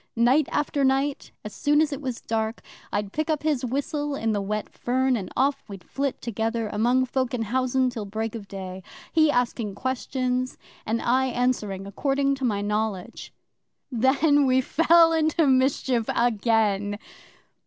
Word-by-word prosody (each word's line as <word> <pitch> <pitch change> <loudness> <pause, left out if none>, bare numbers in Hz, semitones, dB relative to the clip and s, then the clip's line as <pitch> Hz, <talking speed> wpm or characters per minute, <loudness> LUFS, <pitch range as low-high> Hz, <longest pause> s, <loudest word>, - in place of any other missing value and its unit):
Night 250 +6 +3
after 295 -1 0
night, 270 +1 0
as 210 - -6
soon 295 +8 +2
as 305 -1 +2
it 280 - -6
was 255 -4 -4
dark, 220 0 -2 0.3
I'd 205 -1 -2
pick 310 +1 -2
up 305 -2 0
his 300 -5 0
whistle 285 +3 -2
in 225 -4 -1
the 205 -1 0
wet 210 +2 -3
fern, 260 +1 0
and 195 -5 -5
off 275 +2 +1
we'd 195 -4 -9
flit 275 +8 -3
together 225 0 -2
among 240 +5 +2
folk 255 -1 -1
in 230 - -1
housen 255 +3 +1
till 225 -4 -5
break 220 +2 -4
of 215 -4 -7
day 190 -1 -7 0.3
he 315 -2 +4
asking 235 -6 -1
questions, 255 +1 -2 0.3
and 225 +1 -1
I 260 +2 +2
answering 235 -6 -1
according 275 +7 0
to 270 - -7
my 210 -5 0
knowledge. 210 0 -3 0.6
Then 275 +4 +3
we 260 0 +4
fell 330 +4 +4
into 315 0 +2
mischief 260 -3 +2
again! 215 -3 +1
250 Hz, 160 wpm, -25 LUFS, 220-275 Hz, 0.6 s, he